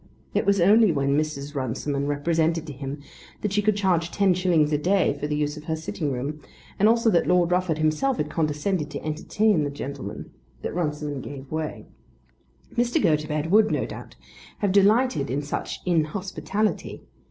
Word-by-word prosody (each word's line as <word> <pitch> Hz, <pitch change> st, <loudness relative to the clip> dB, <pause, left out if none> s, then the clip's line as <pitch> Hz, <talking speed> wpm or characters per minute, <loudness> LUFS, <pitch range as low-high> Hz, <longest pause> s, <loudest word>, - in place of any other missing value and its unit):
It -, -, 0 dB
was 200 Hz, -1 st, +4 dB
only 205 Hz, +3 st, +6 dB
when 140 Hz, -2 st, +1 dB
Mrs. 145 Hz, -1 st, -2 dB
Runciman 140 Hz, +2 st, -2 dB
represented 160 Hz, +2 st, 0 dB
to 150 Hz, -, -7 dB
him 140 Hz, +1 st, -6 dB, 0.4 s
that 210 Hz, -2 st, -2 dB
she 210 Hz, -, +3 dB
could 215 Hz, 0 st, +2 dB
charge 180 Hz, -4 st, +1 dB
ten 195 Hz, 0 st, +3 dB
shillings 170 Hz, -4 st, +2 dB
a 150 Hz, -, +2 dB
day 185 Hz, +2 st, +2 dB
for 150 Hz, -, -2 dB
the 150 Hz, -, -1 dB
use 150 Hz, 0 st, -1 dB
of 150 Hz, -, -10 dB
her 160 Hz, -, -1 dB
sitting 155 Hz, -2 st, -3 dB
room, 140 Hz, +4 st, -4 dB, 0.4 s
and 210 Hz, +2 st, +5 dB
also 230 Hz, 0 st, +3 dB
that 170 Hz, -, +2 dB
Lord 180 Hz, -1 st, +3 dB
Rufford 180 Hz, -3 st, +1 dB
himself 155 Hz, -, +1 dB
had -, -, -1 dB
condescended 155 Hz, +1 st, -1 dB
to -, -, -7 dB
entertain 160 Hz, +4 st, +1 dB
the 145 Hz, -, -1 dB
gentleman, 140 Hz, 0 st, -7 dB, 0.3 s
that -, -, -3 dB
Runciman 150 Hz, -4 st, -2 dB
gave 135 Hz, 0 st, -9 dB
way. 155 Hz, 0 st, -4 dB, 0.9 s
Mr. 240 Hz, 0 st, +2 dB
Gotobed 150 Hz, -2 st, 0 dB
would, 215 Hz, +1 st, +5 dB
no -, -, 0 dB
doubt, -, -, -9 dB, 0.4 s
have 200 Hz, -2 st, 0 dB
delighted 200 Hz, -, +3 dB
in 140 Hz, +4 st, -1 dB
such 145 Hz, -, -4 dB
inhospitality. 190 Hz, +5 st, -1 dB
160 Hz, 175 wpm, -25 LUFS, 150-195 Hz, 0.9 s, only